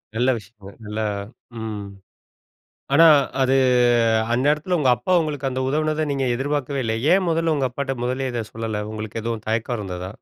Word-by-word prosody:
நல்ல 125 +3 +2
விஷயங்கள். 100 -1 -15
நல்லா 110 +1 -2 0.5
ம். 105 -2 -5 1.1
ஆனா, 165 +2 +8 0.4
அது 130 +1 +3 0.8
அந்நேரத்தில 150 +7 +1
உங்க 130 -3 +3
அப்பா 150 +11 -1
உங்களுக்கு 145 -3 -3
அந்த 130 0 -3
உதவுனத, 155 +1 0
நீங்க 135 -1 -1
எதிர்பாக்கவே 140 0 -2
இல்ல. 110 - 0 0.2
ஏன்? 190 -1 +3
முதல்ல 165 0 +1
உங்க 135 -2 +1
அப்பாட்ட 135 0 -3
முதல்லயே 130 +1 -2
இத 115 -2 -2
சொல்லல. 110 -2 -3
உங்களுக்கு 110 +1 -5
எதுவும், 115 -2 -4
தயக்கம் 115 +2 -1
இருந்ததா? 90 -2 -5
130 Hz, 155 wpm, -22 LUFS, 110-145 Hz, 1.1 s, ஆனா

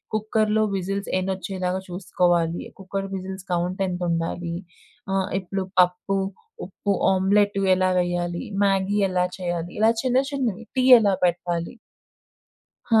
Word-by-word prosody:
కుక్కర్‌లో 215 0 +1
విజిల్స్ 195 +2 -3
ఎన్నొచ్చేలాగా 185 0 -2
చూసుకోవాలి. 175 -2 0 0.2
Cooker 195 +1 -4
whistles 190 0 -6
కౌంటెంతుండాలి. 175 -1 -1 0.6
ఆహ్, 195 0 0
ఇప్పుడు 190 +1 -3 0.2
పప్పు, 180 +2 0 0.5
ఉప్పు, 200 +2 -3 0.2
ఆమ్లెట్టు 200 +1 +2
ఎలా 185 0 +2
వెయ్యాలి, 175 -1 -1 0.2
మ్యాగీ 195 +1 +1
ఎలా 180 -1 +1
చెయ్యాలి, 175 -1 -3
ఇలా 220 +1 +5
చిన్న 255 0 +2
చిన్నవి, 235 -6 -2
టీ 255 - +2 0.2
ఎలా 205 -3 +2
పెట్టాలి? 175 -1 -1 1.2
హా! 225 - +6
185 Hz, 110 wpm, -24 LUFS, 175-200 Hz, 1.2 s, హా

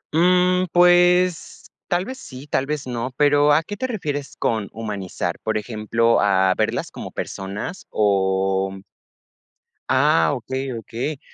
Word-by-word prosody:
Mm, 180 +2 +3
pues, 175 0 +3 0.2
tal 180 0 0
vez 260 +3 -7
sí 130 - -10
tal 135 -2 -1
vez 150 -1 -3
no, 125 0 -4
pero 145 0 +4
¿a 150 +2 +4
qué 205 - -6
te 260 - -2
refieres 145 - -4
con 110 -3 -1
humanizar? 105 -4 -4
Por - - -1
ejemplo, 115 +1 +1
¿a 95 -2 +3
verlas - - -1
como - - -7
personas?, 100 - -6
o 95 -1 +1 1.2
ah, 145 +4 +3
okey, 130 +1 -4
okey. 120 +5 -5
130 Hz, 130 wpm, -22 LUFS, 110-175 Hz, 1.2 s, pero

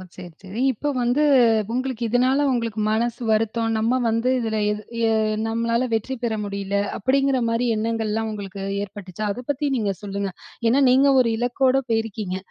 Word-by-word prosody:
சரி, 180 -1 -9
சரி. 195 +4 -7
இப்போ 275 +5 -3
வந்து, 245 +5 +2 0.5
உங்களுக்கு 255 -1 -2
இதனால 255 +4 +2
உங்களுக்கு 230 -4 -1
மனசு 235 +2 -1
வருத்தம், 225 +1 +1
"நம்ம 230 +4 +1
வந்து 230 +3 +1
இதில 220 -2 -2
எது 210 0 -3 0.3
எ - - +2 0.3
நம்மளால 230 +2 0
வெற்றி 225 +4 -1
பெற 235 -2 0
முடியல" 200 -1 -4 0.2
அப்படிங்கிற 270 +4 +2
மாரி 230 +2 0
எண்ணங்கள்லாம் 220 0 -1
உங்களுக்கு 200 -2 -7 0.2
ஏற்பட்டுச்சா? 200 0 -7
அதை 245 - -5
பத்தி 285 +1 0
நீங்க 210 -5 0
சொல்லுங்க, 200 -1 -3 0.4
ஏன்னா, 270 +4 +3
நீங்க 265 +3 +5
ஒரு 235 - +1
இலக்கோடு 255 +2 +2
போயிருக்கீங்க, 220 -4 -2
225 Hz, 155 wpm, -23 LUFS, 210-250 Hz, 0.5 s, நீங்க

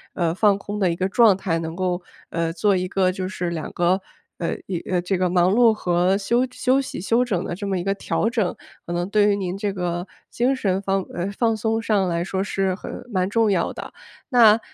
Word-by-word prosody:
呃， 170 -1 0
放 205 -1 +4
空 205 +1 -6
的 185 -4 +2
一 170 - -3
个 185 - 0
状 215 0 +5
态， 170 -4 -1
能 160 0 -4
够， 180 -1 -1 0.3
呃， 165 -1 -1
做 190 +4 +2
一 185 0 -1
个 185 -1 +1
就 185 0 -4
是 175 -2 -3
两 165 -2 -4
个， 180 +2 +1 0.4
呃， 170 - -2
一 185 - -2
呃， 180 -1 +1
这 180 +1 -1
个 180 -1 +1
忙 180 0 +3
碌 235 -1 +5
和 180 -1 +1
休 235 +5 +1
休 265 +2 +2
息、 265 - -6
休 230 +6 +2
整 195 -8 -1
的 175 - -4
这 200 - -6
么 195 -1 -1
一 175 - -5
个 195 - +1
调 215 +2 -1
整， 220 -6 0 0.3
可 170 - -6
能 175 +2 -2
对 210 0 +4
于 200 - +2
您 185 -1 -3
这 205 0 -1
个 175 -1 -3 0.2
精 250 +3 +1
神 195 -7 0
放 195 0 0
呃， 180 +3 -3
放 225 +2 +1
松 225 +1 -1
上 205 -5 +1
来 170 0 -1
说 190 0 -2
是 195 -2 -1
很 - - -8 0.2
蛮 185 -3 0
重 225 0 +2
要 180 -4 +1
的。 - - -8 0.3
那， 230 -4 +6
190 Hz, 250 characters per minute, -23 LUFS, 180-210 Hz, 0.4 s, 那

